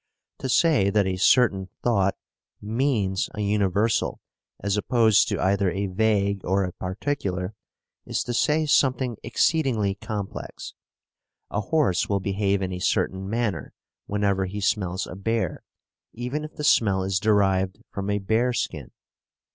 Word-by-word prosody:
To 130 - -4
say 135 - +4
that 100 0 +2
a 95 -1 -1
certain 95 -1 +3
thought 100 -5 +2 0.4
"means" 110 -4 0
a 105 - -3
universal 105 +1 +1 0.4
as 100 0 -1
opposed 110 0 +3
to - - -2
either 100 +1 +2
a 95 +3 -2
vague 100 0 +1
or 95 +2 +1
a 90 -1 -4
particular, 95 -2 -3 0.5
is - - -1
to 120 - -4
say 155 +5 +2
something 130 -5 +2
exceedingly 125 -11 +1
complex. 105 -1 -6 0.8
A 105 - -1
horse 135 - +1
will 100 -1 +1
behave 100 0 0
in 95 0 -3
a 90 - -4
certain 95 +1 0
manner 115 -2 -2 0.3
whenever 100 -2 0
he 100 +3 -5
smells 95 -2 0
a - - -8
bear, 115 +4 -2 0.5
even 125 +6 -4
if 155 - -11
the 150 - -6
smell 100 -9 +3
is 95 0 0
derived 95 -3 +2
from 100 0 -4
a 100 - +1
bearskin. 110 +4 -1
100 Hz, 140 wpm, -25 LUFS, 95-115 Hz, 0.8 s, say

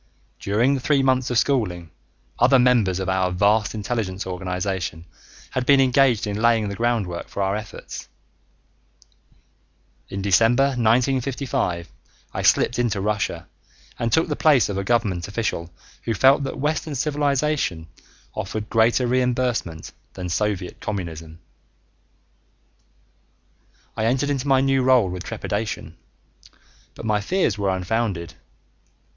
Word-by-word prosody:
During 115 +7 +2
the 135 - -1
three 140 +1 +2
months 130 -1 +2
of 125 - 0
schooling, 90 - 0 0.5
other 130 +3 +5
members 120 -7 +3
of 95 - -3
our 95 -1 +1
vast 100 +4 +2
intelligence 105 -3 -3
organization 90 -2 -3 0.5
had 130 - -1
been 140 -1 +6
engaged 130 -3 +3
in 105 0 -3
laying 115 -3 +3
the 100 - -5
groundwork 110 -7 -1
for 100 - -3
our 95 +1 0
efforts. 110 +1 -8 2.0
In 95 0 -4
December 115 +7 +4
1955, 125 - 0 0.4
I - - -2
slipped 120 - +3
into 115 -4 0
Russia 105 +1 -2 0.5
and 115 -1 -1
took 160 - +3
the 150 - -2
place 145 -8 +4
of 100 - -3
a - - -2
government 100 -6 0
official 100 -5 -3 0.4
who 115 - -1
felt 135 +5 +5
that 135 - -5
Western 150 +1 -2
civilization 145 - 0 0.5
offered 105 +1 -5
greater 115 +3 +3
reimbursement 125 -9 -1 0.2
than 90 -1 -6
Soviet 95 +1 -2
Communism. 80 -5 -5 2.6
I 110 - -1
entered 130 +5 +1
into 140 0 -2
my 135 -1 +4
new 135 -1 +2
role 125 -7 +4
with 90 0 -5
trepidation, 100 -6 -4 1.0
but - - -8
my 105 -1 +1
fears 115 - 0
were 100 -1 0
unfounded. 95 -2 -2
110 Hz, 130 wpm, -23 LUFS, 95-130 Hz, 2.6 s, been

